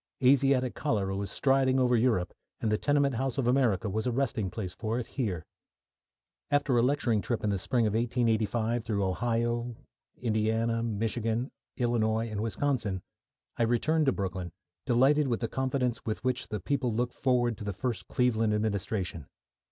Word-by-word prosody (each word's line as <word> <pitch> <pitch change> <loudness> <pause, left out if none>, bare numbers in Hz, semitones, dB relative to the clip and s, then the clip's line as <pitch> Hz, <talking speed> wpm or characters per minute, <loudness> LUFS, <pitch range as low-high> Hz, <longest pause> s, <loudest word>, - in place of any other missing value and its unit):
Asiatic 130 -1 +4
cholera 100 -9 -1
was 100 -1 -3
striding 135 +2 +2
over 125 -1 +3
Europe, 110 -7 +1 0.3
and 110 - 0
the 105 - +3
tenement 145 -2 +2
house 130 +3 -2
of 130 -3 0
America 120 -6 +2
was 110 +4 -2
a - - +1
resting 115 -6 -1
place 95 -2 -5
for 110 +1 -2
it 125 - -2
here. 95 - -3 1.0
After 145 -2 +2
a 120 - +4
lecturing 120 -4 +2
trip 120 +1 -2
in 105 - +1
the 100 - -1
spring 120 +4 +1
of 105 - 0
1885 115 0 +1
through 105 -3 -1
Ohio, 120 +4 -1 0.4
Indiana, 115 0 0
Michigan, 115 +2 -1 0.3
Illinois, 115 -2 +1
and 105 -1 -2
Wisconsin, 110 -4 -1 0.5
I - - -2
returned 140 +7 +2
to - - +5
Brooklyn, 95 -4 -3 0.4
delighted 135 +4 +4
with 120 -3 0
the 115 - -1
confidence 130 -1 -1
with 110 - -3
which 130 0 -1
the 105 - -3
people 130 +3 -1
looked 120 +2 -1
forward 120 -3 +1
to - - -6
the 100 - -2
first 120 +3 -3
Cleveland 115 -3 +1
administration. 100 -6 -2
115 Hz, 165 wpm, -29 LUFS, 110-125 Hz, 1.0 s, to